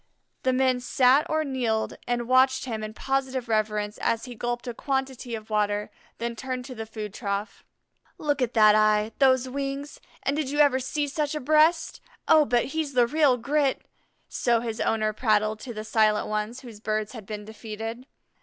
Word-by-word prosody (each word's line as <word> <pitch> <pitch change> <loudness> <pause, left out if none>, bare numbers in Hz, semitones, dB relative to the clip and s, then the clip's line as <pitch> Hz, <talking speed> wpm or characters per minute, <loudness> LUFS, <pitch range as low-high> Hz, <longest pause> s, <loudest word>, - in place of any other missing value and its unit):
The 260 - +2
men 255 -1 +2
sat 260 +4 +3
or 315 0 +1
kneeled 245 -6 -1
and 240 -1 -1
watched 260 +1 +4
him 220 -4 -4
in 215 0 -6
positive 265 -1 -2
reverence 210 -1 -1
as 230 +2 0
he 250 - -8
gulped 240 +1 -3
a 240 - -3
quantity 265 -2 -3
of 220 0 -10
water, 210 -1 0 0.3
then 235 0 -3
turned 255 +1 -4
to 255 - -8
the 225 -2 -7
food 215 -2 -6
trough. 200 -1 -4 0.5
"Look 290 -2 -1
at 250 -1 -1
that 215 -1 +7
eye, 215 0 +3
those 260 -2 +4
wings, 275 +2 -5 0.2
and 275 - 0
did 300 -3 -1
you 290 - -3
ever 285 -3 +5
see 290 +3 -2
such 295 +1 -2
a - - -1
breast? 310 +4 +3 0.3
Oh, 315 -2 +6
but 240 +1 +2
he's 315 -3 -2
the 245 -1 +4
real 285 0 +3
grit!" 275 +3 0 0.4
so 235 -1 +1
his 230 -1 -4
owner 215 -1 +1
prattled 215 -1 +1
to 245 - -7
the 215 -2 -6
silent 215 -1 +2
ones 215 +4 -3
whose 235 -5 -11
birds 215 0 -2
had 220 -6 -10
been 210 -1 -6
defeated. 225 +3 -7
240 Hz, 185 wpm, -26 LUFS, 215-270 Hz, 0.5 s, that